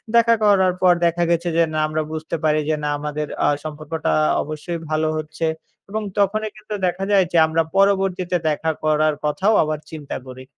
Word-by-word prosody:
দেখা 230 0 +5
করার 190 -3 +4
পর 180 -1 +6
দেখা 170 +1 +1
গেছে 170 +1 +1
যে 170 - +5
না, 155 - 0
আমরা 155 0 -1
বুঝতে 160 +1 -4
পারি 155 0 +3
যে, 155 - +2
না 150 - 0
আমাদের 150 0 -3 0.2
আ - - +4 0.2
সম্পর্কটা 155 - -3 0.3
অবশ্যই 155 +3 -5
ভালো 155 0 +1
হচ্ছে 155 +1 -4 0.4
এবং 215 +2 -2 0.2
তখনই 215 +2 +1
কিন্তু 215 0 -8
দেখা 180 +2 -2
যায় 195 -2 +5
যে 175 - +2
আমরা 160 +1 +1 0.2
পরবর্তীতে 190 -2 +2
দেখা 160 +1 0
করার 155 0 +2
কথাও 190 +8 +2
আবার 155 -1 -2
চিন্তা 150 -3 -6
করি। 130 0 -9
165 Hz, 180 wpm, -21 LUFS, 155-190 Hz, 0.4 s, পর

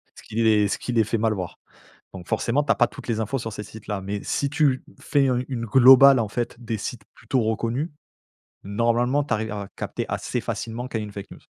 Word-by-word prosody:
Ce - - -14
qui - - -11
les 110 -2 +4
ce - - -1
qui 125 - -5
les 115 -2 +3
fait 115 - -1
mal 110 0 +1
voir. 90 -4 -5 0.6
Donc 90 -2 -10
forcément 130 +5 +1
tu 145 - -4
as - - +6
pas 120 - +4
toutes - - -12
les 115 -2 0
infos 110 +5 -1
sur 115 -2 -5
ces 105 - -6
sites-là, 105 -1 -6
mais 100 +2 -4
si 140 - -1
tu, 145 -3 +2 0.2
fais 140 -2 +2
un 125 -1 +1
une 120 -4 -3
globale, 130 +3 +8
en 110 - -1
fait, 120 +3 -3
des 115 -1 -2
sites 110 +2 -5
plutôt 130 -3 -1
reconnus, 115 +8 -1 0.7
normalement 120 +7 +1
tu 140 - -4
arrives 110 0 -3
à 100 -2 -5
capter - - -4
assez - - -2
facilement 120 +3 -4
quand 115 - -3
il - - -3
y - - -4
a - - -6
une 105 - -10
fake 100 -1 -8
news. - - -12
115 Hz, 245 wpm, -24 LUFS, 105-130 Hz, 0.7 s, globale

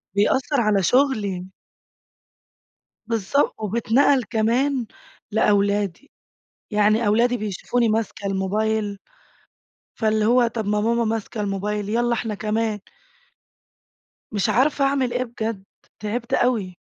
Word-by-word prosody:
بيأثر 260 +6 +2
على 210 -3 +2
شغلي. 210 -8 +1 1.6
بالضبط، 230 +4 0
وبيتنقل 235 +5 +2
كمان 240 +4 0 0.5
لأولادي. 205 - +1 0.6
يعني 210 +2 +3
أولادي 240 +4 +3
بيشوفوني 220 +3 -1
ماسكة 215 -2 -2
الموبايل، 205 +2 -1 1.0
فاللي 215 -1 +1
هو 245 +1 +4
طب 225 -2 -4
ما 210 0 +1
ماما 235 +2 +1
ماسكة 220 0 -3
الموبايل، 205 +1 -2
يالّا 240 +2 +1
إحنا 225 -2 -3
كمان. 215 +1 -1 1.5
مش 210 +1 0
عارفة 275 +5 +2
أعمل 270 -3 +1
إيه 250 - 0
بجد. 225 -4 -5 0.4
تعبت 225 +3 -4
أوي. 215 -8 +1
220 Hz, 105 wpm, -22 LUFS, 205-240 Hz, 1.6 s, هو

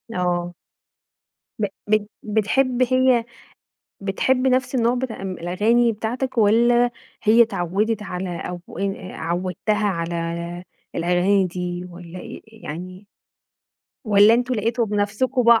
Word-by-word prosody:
آه. 175 -1 -1 1.1
ب 210 - +2 0.2
بت 215 -1 +1
بتحب 240 +4 +1
هي 255 -1 +3 0.8
بتحب 255 +7 +1
نفس 255 0 +1
النوع 240 0 +2
بتاع 250 -4 -4
إم 190 -1 -3
الأغاني 210 +7 +2
بتاعتك 240 +4 -3
والّا 240 +3 +4 0.3
هي 225 +3 +6
اتعودت 210 +1 -1
على 180 -2 -4
أو 180 0 -5 0.2
إ 195 -1 -3
عودتها 185 +5 -1
على 170 -2 -2 0.6
الأغاني 180 +3 +2
دي 180 0 -4
والّا 175 0 -10
إ 235 +4 -8
يعني، 185 -2 -9 1.0
والّا 210 -1 +6
أنتم 245 +2 +1
لقيتوا 230 +1 0
بنفسكم 220 +4 +1
210 Hz, 110 wpm, -22 LUFS, 180-235 Hz, 1.1 s, هي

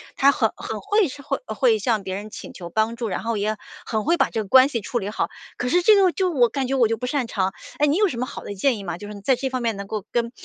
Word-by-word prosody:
他 280 +1 +5
很 - - +1
很 - - -5
会， 410 -1 +2 0.2
会 - - -2
会 455 -3 +3
向 225 - 0
别 190 0 -4
人 205 +2 -6
请 - - -9
求 175 -2 -8
帮 220 +5 0
助， 230 -2 -3
然 185 - -3
后 230 0 -1
也 210 +1 -1 0.3
很 220 -2 -2
会 335 +4 +4
把 - - +2
这 220 - -2
个 210 - -7
关 260 +6 +7
系 240 - -1
处 240 +3 -2
理 195 - -4
好。 210 - -1 0.3
可 250 - -2
是 350 +8 +3
这 425 +4 +6
个 385 -3 +5
就 370 -2 0
我 250 -7 +4
感 265 +2 -2
觉 270 - 0
我 240 -4 +4
就 225 - 0
不 230 - -5
擅 255 -1 -1
长。 190 -4 0 0.3
哎， 295 - +3
你 295 - +2
有 420 0 +4
什 255 - -4
么 250 - -1
好 - - -8
的 205 - -5
建 240 +5 +2
议 200 - -7
吗？ 170 -1 -4
就 205 - -9
是 - - -7
你 205 - -9
在 260 +5 +3
这 265 +2 -3
方 255 -1 -2
面 230 -2 0
能 200 0 -6
够 210 -1 -5
跟 235 -1 0
235 Hz, 340 characters per minute, -23 LUFS, 210-280 Hz, 0.3 s, 关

